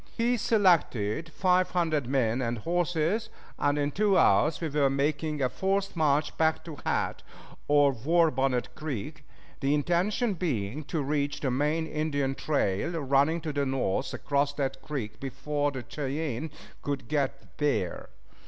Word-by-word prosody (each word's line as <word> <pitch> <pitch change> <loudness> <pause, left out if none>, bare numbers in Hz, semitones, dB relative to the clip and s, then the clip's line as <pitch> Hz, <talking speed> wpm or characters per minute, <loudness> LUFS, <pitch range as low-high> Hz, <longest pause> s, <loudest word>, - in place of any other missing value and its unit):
He 240 +1 +2
selected 165 - +2
five 185 +1 +2
hundred 160 -7 0
men 125 -2 +1
and 120 -1 -1
horses, 175 - 0 0.3
and 145 0 +2
in 145 0 0
two 200 +2 +2
hours 145 - +4
we 165 - -2
were 145 -2 +2
making 145 +2 0
a - - +4
forced 195 +6 -1
march 150 -2 +1
back 160 0 +2
to 160 -4 -7
Hat, - - -1 0.5
or 145 -1 +5
War 160 +7 +2
Bonnet 130 -3 0
Creek, 150 -1 -5 0.4
the 140 +1 +2
intention 185 - +1
being 145 - -2
to 155 -1 -2
reach 145 0 -1
the 135 - 0
main 150 +5 +1
Indian 145 -3 -1
trail 145 - -1
running 140 +4 +2
to 155 -2 -4
the 145 0 0
north 130 -2 -1
across 145 0 0
that 135 -2 -2
creek 130 -8 -5
before 145 +2 -2
the 130 -3 -6
Cheyennes 145 0 -3 0.3
could 140 -5 -3
get 140 -1 -2
there. 145 - -1
145 Hz, 150 wpm, -28 LUFS, 135-165 Hz, 0.5 s, or